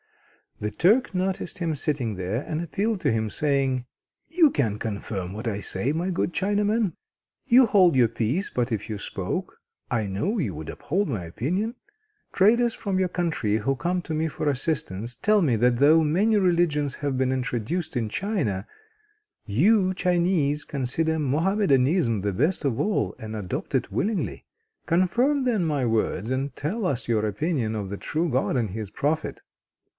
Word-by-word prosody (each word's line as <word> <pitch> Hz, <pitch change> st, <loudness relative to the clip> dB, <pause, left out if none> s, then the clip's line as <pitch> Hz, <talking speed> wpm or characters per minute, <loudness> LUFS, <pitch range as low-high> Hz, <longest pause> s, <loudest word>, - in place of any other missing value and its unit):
The 105 Hz, 0 st, -2 dB
Turk 210 Hz, -, +3 dB
noticed 185 Hz, -1 st, -2 dB
him 170 Hz, -3 st, -1 dB
sitting 135 Hz, -6 st, -2 dB
there, 95 Hz, +8 st, -2 dB
and 155 Hz, +1 st, -3 dB
appealed 200 Hz, +4 st, -1 dB
to -, -, +2 dB
him, 110 Hz, -1 st, 0 dB
saying: 135 Hz, -4 st, 0 dB, 0.4 s
"You 325 Hz, -1 st, +5 dB
can 115 Hz, -8 st, 0 dB
confirm 100 Hz, -4 st, -4 dB
what 110 Hz, +3 st, -5 dB
I 105 Hz, -3 st, -1 dB
say, 105 Hz, +5 st, -2 dB
my 170 Hz, +4 st, -1 dB
good 175 Hz, 0 st, -1 dB
Chinaman. 205 Hz, 0 st, +1 dB, 0.5 s
You 255 Hz, +1 st, +7 dB
hold 185 Hz, -7 st, +5 dB
your 125 Hz, -3 st, +5 dB
peace, 115 Hz, -, -1 dB
but 125 Hz, 0 st, -1 dB
if 110 Hz, -2 st, -2 dB
you 105 Hz, -, -3 dB
spoke -, -, -4 dB, 0.3 s
I 110 Hz, -3 st, 0 dB
know 105 Hz, -, -1 dB
you 125 Hz, -, -1 dB
would 75 Hz, 0 st, -7 dB
uphold 195 Hz, +6 st, -1 dB
my 105 Hz, -, -3 dB
opinion. 180 Hz, -, -2 dB, 0.6 s
Traders 235 Hz, +4 st, +4 dB
from 195 Hz, -3 st, -2 dB
your 185 Hz, -1 st, +1 dB
country, 160 Hz, -, 0 dB
who 135 Hz, +6 st, 0 dB
come 175 Hz, +5 st, -1 dB
to 160 Hz, -, -5 dB
me 160 Hz, +1 st, 0 dB
for 155 Hz, -, -4 dB
assistance, 125 Hz, -, -3 dB
tell 210 Hz, 0 st, +3 dB
me 135 Hz, -9 st, +2 dB
that 120 Hz, +2 st, +3 dB
though 155 Hz, +5 st, +5 dB
many 200 Hz, +9 st, +2 dB
religions 170 Hz, -7 st, +2 dB
have 140 Hz, -3 st, -2 dB
been 130 Hz, 0 st, +1 dB
introduced 130 Hz, +6 st, -2 dB
into 110 Hz, -3 st, -2 dB
China, 125 Hz, -, -1 dB, 0.8 s
you 185 Hz, -, +3 dB
Chinese 175 Hz, -5 st, +1 dB
consider 150 Hz, +5 st, -1 dB
Mohammedanism 150 Hz, -, +2 dB
the 100 Hz, 0 st, -1 dB
best 150 Hz, -, 0 dB
of 125 Hz, -5 st, 0 dB
all, 110 Hz, -, 0 dB
and 110 Hz, 0 st, -6 dB
adopt 100 Hz, -5 st, -4 dB
it -, -, 0 dB
willingly. 210 Hz, 0 st, -2 dB, 0.4 s
Confirm, 235 Hz, -, +2 dB
then, 230 Hz, -7 st, +1 dB
my 145 Hz, -5 st, 0 dB
words, 110 Hz, -2 st, 0 dB
and 130 Hz, 0 st, -2 dB
tell 195 Hz, +9 st, -2 dB
us 130 Hz, -6 st, -2 dB
your 110 Hz, -2 st, +1 dB
opinion 115 Hz, -, -1 dB
of 100 Hz, -3 st, -4 dB
the 100 Hz, -, -4 dB
true 165 Hz, +9 st, -1 dB
God 130 Hz, 0 st, 0 dB
and 115 Hz, -4 st, 0 dB
of 95 Hz, -, -7 dB
His 110 Hz, -3 st, -4 dB
prophet." 155 Hz, +2 st, -2 dB
145 Hz, 170 wpm, -25 LUFS, 115-185 Hz, 0.8 s, You